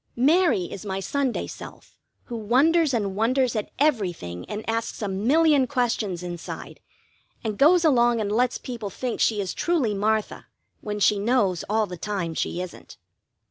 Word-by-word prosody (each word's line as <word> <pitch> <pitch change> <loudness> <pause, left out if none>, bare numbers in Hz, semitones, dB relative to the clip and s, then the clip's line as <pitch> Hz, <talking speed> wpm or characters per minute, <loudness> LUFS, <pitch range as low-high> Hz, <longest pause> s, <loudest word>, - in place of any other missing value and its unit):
Mary 290 - +3
is 175 +2 -7
my 195 -2 -3
Sunday 265 +6 -1
self - - -11 0.3
who 240 - -7
wonders 275 +9 +3
and 205 -6 -1
wonders 245 +3 +1
at 215 - -2
everything 180 - -1
and 210 +1 -5
asks 225 0 -2
a - - -1
million 270 +8 +3
questions 230 -9 -1
inside, 175 -2 -7 0.6
and 215 -3 -3
goes 330 +5 +5
along 240 -5 +4
and 205 -2 -2
lets 245 +3 +1
people 230 -5 -6
think 245 +5 -4
she 215 -2 +2
is 190 -2 -2
truly 310 -11 0
Martha 215 +1 -1 0.3
when 210 0 -4
she 205 0 +3
knows 200 -5 +1
all 215 +1 +2
the 180 -3 -8
time 185 -3 -3
she 170 - -2
isn't. 180 - -11
220 Hz, 160 wpm, -24 LUFS, 200-260 Hz, 0.6 s, goes